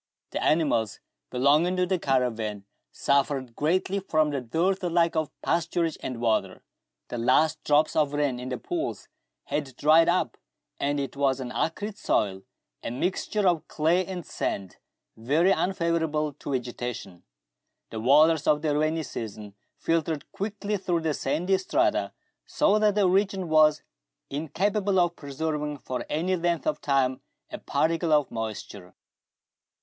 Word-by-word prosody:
The - - -2
animals 145 -9 +1 0.3
belonging 145 +8 +3
to 180 0 +2
the 185 0 0
caravan 115 -8 -1 0.3
suffered 135 -3 0
greatly 185 +5 0
from 155 -5 +1
the 140 -2 -2
dearth 175 - 0
alike 170 -1 +2
of 155 -2 0
pasturage 170 -1 0
and 125 -3 -5
water. 115 -2 0 0.5
The 120 - -4
last 155 +6 +2
drops 150 +1 +3
of 150 -3 +2
rain 145 -4 0
in 125 +1 -6
the 125 - -2
pools 345 0 -4 0.3
had 140 -4 -3
dried 160 +4 +5
up, 180 +1 0 0.4
and 145 +1 0
it 135 -2 -4
was 135 -1 +1
an 125 -2 -5
acrid 205 +9 -3
soil, 95 -2 0 0.4
a - - -4
mixture 185 - -1
of 170 -3 +1
clay 165 +4 +2
and 180 -2 -6
sand, 95 -2 -4 0.4
very 150 +11 +2
unfavourable 165 -5 0
to 140 0 -6
vegetation. 120 -7 -5 0.7
The 110 - -4
waters 150 +5 +4
of 150 0 +3
the 150 -2 +1
rainy 155 +2 +1
season 105 -6 -7 0.2
filtered 165 -2 -1
quickly 205 0 -3
through 175 -3 -1
the 160 -2 0
sandy 180 +8 0
strata, 190 - +1 0.4
so 210 +1 +3
that 210 -1 +3
the 205 -3 +4
region 190 -1 +1
was 155 -1 +4 0.5
incapable 190 +7 0
of 175 -1 +2
preserving 150 +1 -3
for 125 -1 -5
any 175 +5 0
length 170 -2 -1
of 150 - -1
time 130 -2 +1 0.3
a - - -6
particle 165 0 0
of 150 -2 +3
moisture. 105 -4 -6
155 Hz, 145 wpm, -26 LUFS, 130-175 Hz, 0.7 s, dried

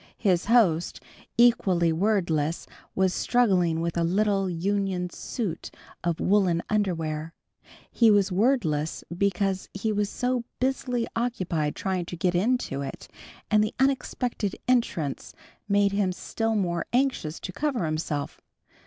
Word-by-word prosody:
His 185 -5 +1
host, 180 - +3 0.4
equally 190 -8 +4
wordless, 170 -5 0 0.3
was 190 -1 +2
struggling 185 -9 +2
with 170 0 -2
a 170 - +1
little 195 +2 +1
union 185 0 -1
suit 190 -5 -4 0.3
of 170 -2 -1
woolen 185 -4 +2
underwear. 165 -6 -1 0.6
He 230 -2 +4
was 205 -2 +4
wordless 180 - +1
because 195 0 0
he 215 +3 -1
was 205 -1 0
so 250 +1 -1 0.2
busily 255 -2 0
occupied 180 -11 -1
trying 185 -3 -2
to 175 - -6
get 175 +1 +1
into 195 - 0
it, 135 -1 -7 0.4
and 215 0 +5
the 215 - -3
unexpected 250 -6 0
entrance 205 - 0 0.3
made 200 0 +3
him 200 -2 +1
still 225 +4 -2
more 175 -4 -1
anxious 245 - 0
to 185 - -6
cover 275 - -1
himself. 155 -2 -3
190 Hz, 125 wpm, -26 LUFS, 170-225 Hz, 0.6 s, and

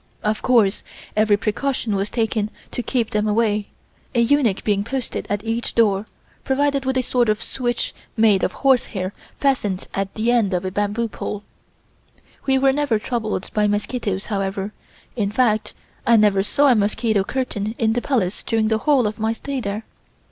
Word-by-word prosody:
Of 215 0 0
course 230 -6 +3 0.3
every 215 -1 +4
precaution 220 +1 -1
was 195 +1 -1
taken 220 -2 0 0.2
to - - -2
keep 240 -2 -1
them 210 +1 +1
away, 210 -1 +1 0.5
a - - +3
eunuch 235 -4 +3
being 205 -2 +1
posted 260 +3 -3
at 205 0 -1
each 230 +1 -2
door, 210 -2 +3 0.4
provided 275 0 +1
with 260 -1 0
sort 240 -3 +2
of 215 -1 +2
a - - -6
switch 240 -2 -2 0.2
made 215 -3 +5
of - - +1
horse 265 -3 +5
hair 185 +1 -2 0.3
fastened 215 -9 0
at 195 0 -2
the 225 +2 +1
end 215 -6 +2
of 180 +1 -2
a 185 - -2
bamboo 205 +4 0
pole. 210 -1 -5 1.0
We 265 0 +4
were 270 0 +4
never 285 -5 +1
troubled 220 -3 -3
by 210 -1 +2
mosquitoes, 205 -1 -1
however; 195 -1 -2 0.4
in 210 -5 0
fact 220 -2 +1 0.3
I 235 - +5
never 205 -2 +4
saw 280 +8 +3
a - - +5
mosquito 210 0 +1
curtain 220 -3 -3
in 220 -1 +2
the 245 - 0
Palace 220 -10 0
during 225 -2 0
the 220 -1 +2
whole 275 -2 +3
of 210 +1 -2
my 220 +1 +1
stay 270 +3 -4
there. 210 +1 -4
220 Hz, 175 wpm, -21 LUFS, 205-245 Hz, 1.0 s, made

